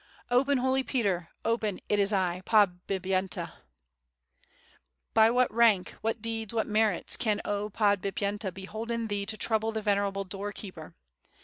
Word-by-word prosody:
'Open, 270 +3 +3
Holy 260 +1 +2
Peter, 200 - -1 0.2
open, 220 -4 0
it 205 - +1
is 200 +1 +3
I, 185 -3 0
Podbip 190 -2 +2
yenta.' 190 0 -1 0.8
'' 65 +1 -35
But 225 +2 +5
what 250 -3 +3
rank, 225 -5 +4
what 225 0 -2
deeds, 225 -1 -4
what 220 - +1
merits, 215 -3 +2
can 215 -3 0
0 205 0 -2
Podbip 200 -2 +1
yenta 205 -1 -2
bolden 220 +4 -4
thee 200 -1 -2
to 215 0 -2
trouble 220 +1 0
the 220 -1 -4
venerable 200 -1 +1
door 195 +2 -5
keeper? 175 -6 -9
205 Hz, 150 wpm, -29 LUFS, 195-225 Hz, 0.8 s, But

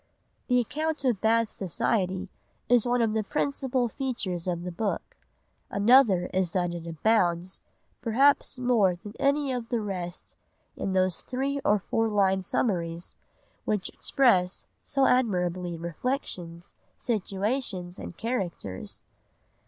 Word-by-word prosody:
The 250 -1 +4
account 305 +4 -2
of 235 -7 +1
Bath 225 0 +3
society 190 0 -1 0.4
is 245 -1 +4
one 245 -1 +2
of 220 -1 +1
the 220 - +1
principal 265 -1 0
features 210 -9 -3
of 175 -1 -1
the 180 - -4
book, 205 +4 -3 0.5
another 205 -3 +5
is 185 -2 0
that 175 -2 0
it 170 -1 -6
abounds, 175 0 +1 0.4
perhaps 265 +4 +3
more 235 -7 +3
than 205 +4 -10
any 280 -1 +2
of 240 -2 -4
the 240 - 0
rest, 185 -4 -5 0.4
in 195 - -2
those 185 -2 +2
three 275 +2 -2
or 210 - +4
four 225 +3 0
line 195 -2 +2
summaries 170 -4 -1 0.5
which 210 -3 0
express 190 -9 +2 0.2
so 275 -2 +1
admirably 180 -8 +1
reflections, 170 - -4 0.2
situations, 200 -3 -2
and 175 - -8
characters. 185 - -4
205 Hz, 125 wpm, -27 LUFS, 180-245 Hz, 0.5 s, another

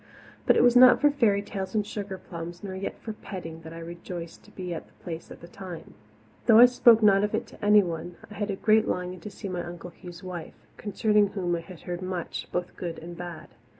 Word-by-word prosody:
But - - +6
it - - +5
was 245 0 +5
not 250 0 +8
for 295 -1 +5
fairy 215 -8 +2
tales 190 0 -5
and 210 -1 +1
sugarplums 185 -4 -7
nor 195 -2 -5
yet 190 +1 -4
for 220 - -6
petting 165 -6 -8
that 160 0 -10
I 165 - -9
rejoiced 170 0 -7
to - - -16
be 180 -3 -5
at 160 - -7
the - - -26
Place 165 -2 -6
at - - -11
that 170 - -13
time. 185 -4 -9 0.5
Though 225 -2 +8
I 240 - +11
spoke 235 -2 +5
not 200 -1 +6
of 210 - 0
it - - -2
to - - -15
anyone, 175 -5 +3
I 210 - -12
had 205 0 -3
a 200 - -1
great 215 +2 +3
longing 180 0 -2
to 190 - -8
see 200 - -8
my 180 -2 -3
Uncle 175 0 -8
Hugh's 175 0 -11
wife, 180 -3 -7 0.2
concerning 210 0 +2
whom 185 -3 -1
I 170 - -3
had 175 0 -12
heard 175 0 -5
much, 185 -2 -4
both 180 0 -3
good 170 -2 -5
and 170 +1 -8
bad. 175 -1 -8
185 Hz, 230 wpm, -27 LUFS, 175-210 Hz, 0.5 s, I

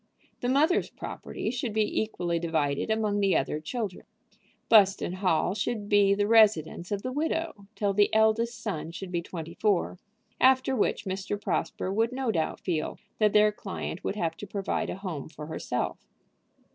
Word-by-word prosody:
The 245 - -1
mother's 305 +7 +3
property 220 - -5
should 245 -3 -3
be 215 -1 +1
equally 175 -6 -2
divided 155 -1 -1
among 215 -2 +1
the 195 -2 +3
other 135 +3 -1
children. 200 +4 -5 0.6
Buston 195 -4 +5
Hall 185 -2 +1
should 215 0 -2
be 200 -1 +5
the 205 0 +1
residence 205 -6 +3
of 200 -1 -2
the 255 - -3
widow 315 -6 -2
till 200 0 0
the 205 +1 +3
eldest 220 +1 +2
son 190 -8 -4
should 180 +2 -7
be 170 -1 -1
twenty 165 -1 -7
four, 190 -2 0 0.4
after 260 0 +4
which 220 - 0
Mr. 195 +2 -3
Prosper 190 -1 -2
would 225 +3 +1
no 260 -3 0
doubt 160 -6 -2
feel 160 -4 -2 0.2
that 210 -2 +3
their 210 0 +6
client 195 -4 -6
would - - -2
have 165 -5 -1
to 205 - -8
provide 195 0 -2
a - - -3
home 180 -8 -6
for 150 -1 -9
herself. 160 - -3
205 Hz, 170 wpm, -28 LUFS, 175-220 Hz, 0.6 s, their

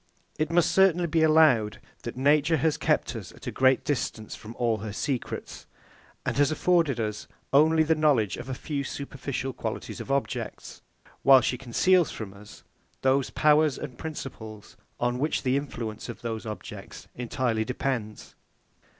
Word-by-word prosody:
It 155 0 +1
must 170 0 +3
certainly 185 -3 +4
be 165 -1 +1
allowed, 155 -9 +4 0.2
that - - -7
nature 150 +4 +3
has 160 -1 +1
kept - - 0
us - - -7
at - - -14
a - - -3
great 130 0 +3
distance 115 -6 -2
from 110 +2 -10
all 115 -2 +1
her 110 0 -6
secrets, 130 +2 -4 0.6
and - - -1
has 145 -1 +4
afforded 160 -4 +2
us 105 -2 -3 0.3
only 160 +3 +5
the 160 +1 +3
knowledge 145 - +2
of - - -8
a 130 - -3
few 140 +1 -3
superficial 135 -1 -4
qualities - - -5
of - - -6
objects; 140 0 -3 0.4
while 135 -1 +7
she 125 - 0
conceals 150 +7 +2
from 105 -4 -7
us 105 +1 -14 0.4
those 135 0 +2
powers 150 -2 +3
and 125 - -8
principles 110 -9 -8 0.2
on 120 +1 0
which 150 +3 0
the 130 -1 +2
influence 115 -6 -4
of - - -8
those 115 -1 -4
objects 105 - -8
entirely 120 -2 -1
depends. 120 -3 -4
135 Hz, 160 wpm, -27 LUFS, 115-155 Hz, 0.6 s, while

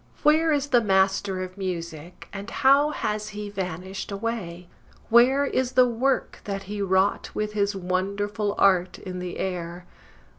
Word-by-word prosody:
Where 315 +2 +4
is 290 -1 0
the 245 -3 +4
Master 190 -1 +1
of 185 +2 -9
Music, 170 -3 -6
and 200 0 -6
how 275 +2 +4
has 210 -7 -3
he 210 -1 -5
vanished 190 0 -5
away? 195 -5 -4 0.4
Where 255 +5 +5
is 260 -2 -1
the 250 0 +5
work 250 +3 -1
that 195 -1 -4
he 205 +1 -5
wrought 190 +1 +1
with 210 0 -2
his 200 -1 0
wonderful 200 +3 -2
art 185 -2 +3
in 185 -1 -7
the 180 -1 -5
air? 175 -1 -4
200 Hz, 150 wpm, -25 LUFS, 185-230 Hz, 0.4 s, Where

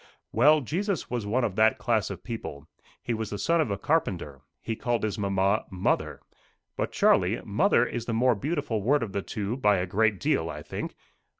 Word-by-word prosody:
"Well, 150 +7 +5
Jesus 180 - -2
was 120 -4 -2
one 120 +5 +1
of 105 -5 -1
that 110 0 +4
class 110 -4 0
of 95 -4 -7
people. 80 - -7 0.4
He 120 - -1
was 110 -1 -3
the 105 - -4
son 165 - +2
of 150 - -1
a 100 - -1
carpenter. 95 - -1 0.2
He 115 - -4
called 120 0 -1
his 105 -1 -2
mamma, 100 +1 +1
mother. 95 -1 -1 0.5
But, - - -2
Charlie, - - +3
mother - - +3
is 120 -1 -4
the 115 - -3
more 125 +2 +3
beautiful 140 - -2
word 135 +5 +2
of 110 - -5
the 100 - -1
two, 105 +4 -4
by 105 -6 +3
a 90 - 0
great 105 +2 +1
deal, - - 0
I - - -7
think. - - -6
110 Hz, 200 wpm, -27 LUFS, 100-125 Hz, 0.5 s, Well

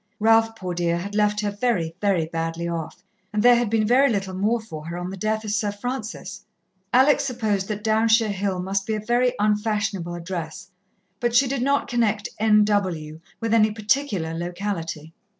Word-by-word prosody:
Ralph, 225 +1 +4
poor 185 -4 -5
dear, 170 -1 0
had 200 +4 -5
left 210 0 +2
her 205 -1 -1
very, 200 -7 -1
very 195 -6 +2
badly 165 +1 -3
off, 170 +1 -5 0.3
and 210 0 0
there 245 0 +8
had 240 -2 +1
been 220 0 +2
very 260 +5 +4
little 195 -4 -2
more 210 +5 +1
for 160 -8 -9
her 170 +1 -5
on 180 +1 -4
the - - -5
death 215 +3 -1
of 210 - -3
Sir 210 -1 0
Francis. 220 +2 -6 0.5
Alex 280 +3 +5
supposed 220 -7 -1
that 210 -1 -4
Downshire 220 0 +3
Hill 195 -1 -2
must 195 +2 -2
be 220 - 0
a - - -2
very 240 +3 +1
unfashionable 210 -4 0
address, 175 +2 -6 0.5
but 240 -1 0
she 270 +3 +6
did 265 -1 -2
not 280 +2 +1
connect 220 -4 0
"N.W." 205 -8 +2 0.2
with 230 -1 -1
any 220 -1 +5
particular 215 - -1
locality. 170 -2 -4
210 Hz, 180 wpm, -23 LUFS, 180-225 Hz, 0.5 s, there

